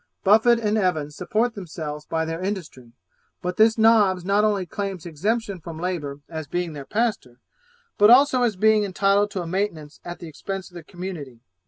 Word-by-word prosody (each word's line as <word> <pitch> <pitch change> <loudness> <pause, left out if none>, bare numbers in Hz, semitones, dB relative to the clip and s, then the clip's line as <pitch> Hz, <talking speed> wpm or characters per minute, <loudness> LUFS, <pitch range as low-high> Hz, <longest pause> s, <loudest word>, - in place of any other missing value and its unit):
Buffet 220 +4 +5
and 215 -1 +1
Evans 155 -6 -1
support 220 +7 0
themselves 155 -6 -7
by 160 0 -1
their 165 +2 -4
industry, 165 - -5 0.5
but 180 0 -3
this 220 +1 +5
Nobbs 210 -5 +4
not 200 +2 +2
only 205 -3 +1
claims 195 -1 -5
exemption 200 +5 -2
from 165 -1 -8
labour 155 -6 -4
as 160 -2 -6
being 175 -1 -3
their 140 -2 -8
pastor, 210 - -2 0.6
but 210 +1 +7
also 260 +1 +6
as 235 -4 +1
being 215 +2 +4
entitled 200 +1 +2
to 190 -3 -4
a - - -7
maintenance 165 -5 -3
at 175 0 -7
the 170 - -9
expense 190 +5 -6
of - - -25
the 175 -2 -9
community. 160 -9 -8
185 Hz, 180 wpm, -23 LUFS, 160-210 Hz, 0.6 s, but